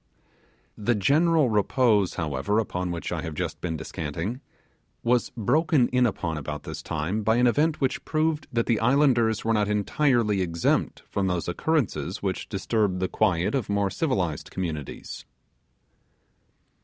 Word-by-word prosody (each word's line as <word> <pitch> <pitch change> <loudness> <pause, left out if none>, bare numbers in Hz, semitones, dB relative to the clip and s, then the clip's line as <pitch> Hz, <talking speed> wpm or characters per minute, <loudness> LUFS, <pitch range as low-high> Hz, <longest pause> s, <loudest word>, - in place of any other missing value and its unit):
The 120 +3 +1
general 150 - +3
repose, 105 -2 +2
however, 80 +6 -1
upon 90 -5 -1
which 85 -3 -4
I - - -2
have 80 -2 -5
just - - -4
been 80 -2 -2
descanting, 80 - -4 0.6
was 120 0 +2
broken 135 - +2
in 125 -1 +3
upon 80 -7 -3
about 75 +1 -6
this 80 -2 -6
time 85 +7 -2
by 110 +2 +2
an 125 +1 +3
event 150 +6 +2
which 135 -2 -1
proved 155 -1 0
that 115 -1 0
the 115 -3 +1
islanders 120 -3 +3
were 115 - +2
not 105 -2 +2
entirely 105 0 +1
exempt 85 -2 0
from 100 -1 -1
those 90 -3 -1
occurrences 145 - -1
which - - -3
disturb 105 -5 0
the 95 0 0
quiet 90 -2 +1
of 130 -7 -1
more 100 -1 +1
civilized 95 - -1
communities. 80 -6 -5
105 Hz, 145 wpm, -26 LUFS, 90-125 Hz, 0.6 s, general